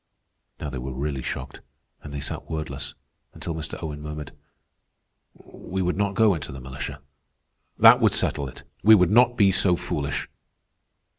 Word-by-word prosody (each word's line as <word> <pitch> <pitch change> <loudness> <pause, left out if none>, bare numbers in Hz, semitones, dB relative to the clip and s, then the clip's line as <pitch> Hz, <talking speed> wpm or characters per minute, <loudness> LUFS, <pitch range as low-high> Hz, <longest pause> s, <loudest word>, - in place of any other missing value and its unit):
Now 75 - -4
they 65 - -5
were 65 +1 -5
really 70 0 -3
shocked, 65 +1 -6 0.4
and 75 - -9
they 70 -1 -5
sat 70 - -5
wordless, 75 -3 -5 0.4
until 80 - -5
Mr. 80 -3 -5
Owen 75 -2 -5
murmured: 75 -1 -6 1.0
"We 95 +1 -6
would 90 0 0
not 100 0 0
go 110 -2 +5
into 80 -4 -5
the 65 - -8
militia. 65 +2 -7 0.8
That - - +8
would - - +4
settle 70 - 0
it. - - -13 0.2
We 110 +1 +8
would 90 -2 +3
not 120 +2 +5
be 100 -3 +5
so 90 -1 +4
foolish." 70 -4 -3
75 Hz, 160 wpm, -25 LUFS, 70-95 Hz, 1.0 s, That